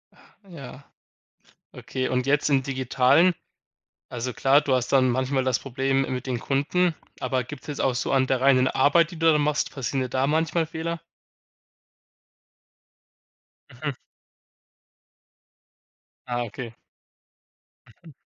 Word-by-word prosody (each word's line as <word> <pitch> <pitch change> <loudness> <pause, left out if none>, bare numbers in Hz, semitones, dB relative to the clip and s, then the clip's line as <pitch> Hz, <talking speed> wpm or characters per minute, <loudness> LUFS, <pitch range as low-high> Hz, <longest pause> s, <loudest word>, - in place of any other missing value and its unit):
Ach, 200 -2 -24
ja. 140 -4 -11 0.9
Okay 130 -1 -4
und 125 0 -1
jetzt 145 +1 +2
im 135 -2 +3
Digitalen 135 +6 +3 0.8
also 120 +1 -4
klar, 135 +4 +4
du 145 -3 0
hast 125 -1 -1
dann 130 -2 +4
manchmal 130 +1 0
das 130 -2 +2
Problem 135 0 -1
mit 130 -2 -3
den 125 -2 -1
Kunden, 155 +8 0 0.3
aber 130 -3 -1
gibt's 135 +1 -10
jetzt 145 -2 -5
auch 130 -2 +1
so 125 - -2
an 130 -1 +2
der 130 -1 0
reinen 130 -1 +4
Arbeit, 155 +6 +3
die 170 - -9
du 165 0 +5
da 150 - +3
machst 150 0 0
passieren 135 -1 -3
dir 130 - -3
da 130 +2 0
manchmal 160 +2 +1
Fehler? 165 +1 -4 2.7
Mhm. 140 +3 -4 2.3
Ah, 120 -1 -2
okay. 115 +1 -8 1.3
Mhm. 160 - -13
135 Hz, 130 wpm, -25 LUFS, 130-150 Hz, 2.7 s, du